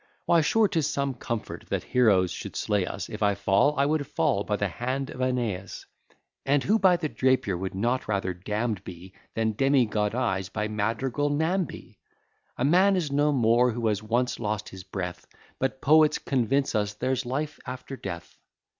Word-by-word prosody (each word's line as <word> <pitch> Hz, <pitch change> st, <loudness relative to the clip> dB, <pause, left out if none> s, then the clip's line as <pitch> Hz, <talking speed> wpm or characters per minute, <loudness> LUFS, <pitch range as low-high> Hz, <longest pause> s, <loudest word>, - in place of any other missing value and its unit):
Why 170 Hz, -1 st, +4 dB
sure 215 Hz, +7 st, +3 dB
'tis 165 Hz, -7 st, 0 dB
some 140 Hz, -1 st, -1 dB
comfort 115 Hz, -2 st, -5 dB
that -, -, -1 dB
heroes 100 Hz, -8 st, +3 dB
should -, -, -7 dB
slay 100 Hz, -4 st, 0 dB
us, 100 Hz, -, -5 dB
If 110 Hz, -, -8 dB
I 100 Hz, -1 st, +3 dB
fall, 100 Hz, +9 st, +2 dB
I 140 Hz, -, +3 dB
would 145 Hz, -2 st, 0 dB
fall -, -, +1 dB
by -, -, -1 dB
the -, -, 0 dB
hand 130 Hz, +2 st, -3 dB
of -, -, -9 dB
Æneas; 120 Hz, -7 st, -2 dB, 0.6 s
And 140 Hz, 0 st, +2 dB
who 215 Hz, +3 st, +2 dB
by 185 Hz, -3 st, +5 dB
the 165 Hz, -3 st, -2 dB
Drapier 130 Hz, -9 st, +1 dB
would 95 Hz, +2 st, -4 dB
not 120 Hz, +6 st, 0 dB
rather 100 Hz, -3 st, -1 dB
damn'd 105 Hz, +3 st, -3 dB
be, 90 Hz, +1 st, -10 dB, 0.2 s
Than 110 Hz, -1 st, 0 dB
demigoddized 105 Hz, -6 st, +1 dB
by 105 Hz, 0 st, -2 dB
madrigal 115 Hz, +7 st, -1 dB
Namby? 160 Hz, +5 st, -2 dB, 0.6 s
A 125 Hz, -, 0 dB
man 185 Hz, +6 st, +5 dB
is 165 Hz, -6 st, -1 dB
no 145 Hz, +1 st, +3 dB
more 120 Hz, -1 st, +3 dB
who 115 Hz, 0 st, -3 dB
has 105 Hz, -1 st, -1 dB
once 120 Hz, +3 st, -1 dB
lost 105 Hz, -1 st, -3 dB
his 95 Hz, -1 st, -10 dB
breath; 90 Hz, -2 st, -6 dB, 0.3 s
But 135 Hz, 0 st, -2 dB
poets 155 Hz, +1 st, +5 dB
convince 135 Hz, +1 st, 0 dB
us 105 Hz, -2 st, -1 dB
there's 130 Hz, 0 st, -1 dB
life 145 Hz, +4 st, -3 dB
after 130 Hz, +2 st, -6 dB
death. 90 Hz, -8 st, -8 dB
120 Hz, 175 wpm, -26 LUFS, 105-140 Hz, 0.6 s, by